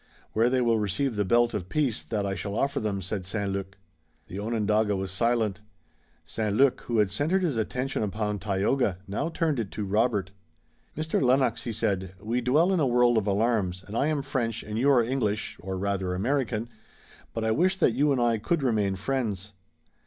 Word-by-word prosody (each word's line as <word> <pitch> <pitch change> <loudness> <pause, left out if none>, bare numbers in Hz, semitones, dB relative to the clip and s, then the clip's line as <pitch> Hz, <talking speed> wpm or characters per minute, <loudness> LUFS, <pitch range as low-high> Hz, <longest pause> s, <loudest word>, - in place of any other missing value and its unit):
"Where 115 +2 +3
they 130 0 +2
will 115 -2 +2
receive 110 +5 -1
the 105 - +1
belt 120 +4 +3
of 95 -4 -4
peace 135 -7 0
that 105 -3 -2
I 100 - -1
shall 100 +1 -4
offer 140 +4 0
them," 100 -3 -2
said 95 +1 -3
St. 100 +1 -2
Luc. 95 0 -5 0.5
The 95 - -5
Onondaga 105 -1 +1
was 95 -1 -3
silent. 110 0 0 0.6
St. 105 -2 -2
Luc, 135 0 +4
who 120 - 0
had 105 -3 +3
centered 160 - +1
his 160 -7 0
attention 125 +4 -2
upon 105 0 -2
Tayoga, 100 +1 0
now 105 +12 -2
turned 160 -5 0
it 110 -4 -2
to 105 - -3
Robert. 105 -2 +1 0.7
"Mr. 155 0 0
Lennox," 130 -1 +2
he 120 - -2
said, 95 -4 -2
"we 115 +5 -1
dwell 155 +10 +3
in 185 - +2
a 145 - +3
world 120 -1 +4
of 110 -2 +1
alarms, 100 -3 +1
and 105 - -8
I 135 - +2
am 150 -3 0
French 115 -4 -2
and 105 +1 -4
you 135 +4 +3
are 125 -4 +5
English, 110 -4 -1
or 95 0 -4
rather 95 -1 -1
American, 120 +1 -1 0.6
but 115 - -3
I 110 - +1
wish 185 - +2
that - - +4
you 145 +4 +2
and 135 - +1
I 120 -2 +2
could 150 +7 0
remain 105 -6 +1
friends." 105 -3 -3
110 Hz, 195 wpm, -27 LUFS, 100-125 Hz, 0.7 s, are